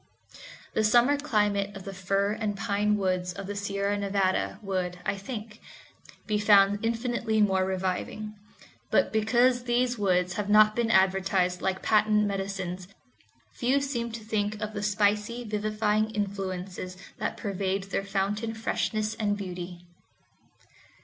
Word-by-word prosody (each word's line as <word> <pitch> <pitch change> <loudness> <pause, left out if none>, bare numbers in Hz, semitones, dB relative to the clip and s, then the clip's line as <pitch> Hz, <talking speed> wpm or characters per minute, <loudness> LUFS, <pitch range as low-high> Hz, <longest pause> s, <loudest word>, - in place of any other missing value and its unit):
The 220 - +1
summer 240 +6 +5
climate 210 -8 0
of 195 - -9
the 195 - -7
fir 195 +2 0
and 215 -2 -2
pine 210 -1 +1
woods 185 -2 -1
of 195 +1 -7
the 205 +1 -5
Sierra 200 0 -1
Nevada 195 -2 0
would, 185 -2 -2
I - - 0
think, 210 +1 -7 0.6
be 210 -1 0
found 205 0 +5
infinitely 230 -1 0
more 190 -3 +3
reviving; 190 +3 -3 0.6
but - - +2
because 245 +3 +3
these 245 0 +1
woods 180 -2 +2
have 205 +1 -3
not 215 0 +6
been 235 -1 +1
advertised 190 -2 +2
like 190 0 -1
patent 210 0 +3
medicines, 195 -2 -3 0.7
few 260 +3 +1
seem 245 -4 -3
to 225 -1 -6
think 215 -1 -1
of 215 0 -4
the 205 - -4
spicy, 210 +3 +1
vivifying 215 0 0
influences 190 -3 -4 0.2
that - - -2
pervade 195 -1 -2
their 195 0 -2
fountain 205 +3 -2
freshness 215 -1 -1
and 205 -2 -1
beauty. 180 -2 -7
205 Hz, 135 wpm, -28 LUFS, 195-215 Hz, 0.7 s, not